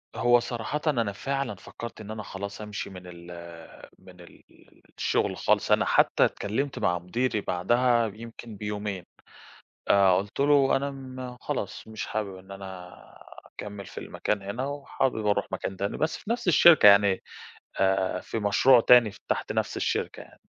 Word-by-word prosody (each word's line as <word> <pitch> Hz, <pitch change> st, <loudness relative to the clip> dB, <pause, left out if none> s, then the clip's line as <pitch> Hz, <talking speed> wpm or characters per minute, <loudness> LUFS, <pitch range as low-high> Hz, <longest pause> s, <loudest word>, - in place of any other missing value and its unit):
هو 120 Hz, 0 st, +4 dB
صراحةً، 120 Hz, +5 st, -4 dB
أنا 115 Hz, -8 st, +1 dB
فعلًا 135 Hz, +3 st, -3 dB
فكرت 115 Hz, +4 st, -9 dB
إن 105 Hz, 0 st, -8 dB
أنا 110 Hz, -1 st, -6 dB
خلاص 100 Hz, +1 st, -7 dB
أمشي 105 Hz, -1 st, -5 dB
من 95 Hz, -2 st, -10 dB
ال 85 Hz, -1 st, -11 dB, 0.7 s
من 90 Hz, -1 st, -16 dB
ال 85 Hz, -, -16 dB, 0.5 s
الشغل -, -, 0 dB
خالص. -, -, +1 dB
أنا -, -, +4 dB
حتى -, -, +4 dB
اتكلمت 130 Hz, +7 st, -2 dB
مع 90 Hz, 0 st, +1 dB
مديري 110 Hz, +5 st, -1 dB
بعدها 120 Hz, +6 st, +2 dB
يمكن 115 Hz, 0 st, -10 dB
بيومين، 105 Hz, -2 st, -4 dB, 0.8 s
آآ، 100 Hz, -1 st, +6 dB
قلت 100 Hz, +6 st, -2 dB
له: 140 Hz, -1 st, +4 dB
"أنا 140 Hz, +1 st, -1 dB
م 130 Hz, -2 st, -8 dB
خلاص -, -, -4 dB
مش 110 Hz, -1 st, -6 dB
حابب 105 Hz, -3 st, -3 dB
إن 95 Hz, +1 st, -14 dB
أنا 95 Hz, -2 st, -9 dB, 0.5 s
أكمل 105 Hz, -1 st, -9 dB
في -, -, -14 dB
المكان 105 Hz, -1 st, -3 dB
هنا، 100 Hz, +7 st, -4 dB
وحابب 140 Hz, -5 st, -2 dB
أروح 105 Hz, -, +2 dB
مكان 95 Hz, -, -4 dB
تاني." 100 Hz, +1 st, -3 dB
بس 155 Hz, -, -1 dB
في -, -, -12 dB
نفس 235 Hz, -3 st, -2 dB
الشركة 170 Hz, -6 st, +7 dB
يعني، 100 Hz, -1 st, +6 dB, 0.6 s
آآ 95 Hz, -1 st, +1 dB
في 115 Hz, -, -5 dB
مشروع 110 Hz, +5 st, +5 dB
تاني 120 Hz, -3 st, +6 dB, 0.2 s
تحت -, -, -1 dB
نفس -, -, -2 dB
الشركة -, -, -2 dB
يعني. -, -, -18 dB
105 Hz, 160 wpm, -27 LUFS, 95-125 Hz, 0.8 s, الشركة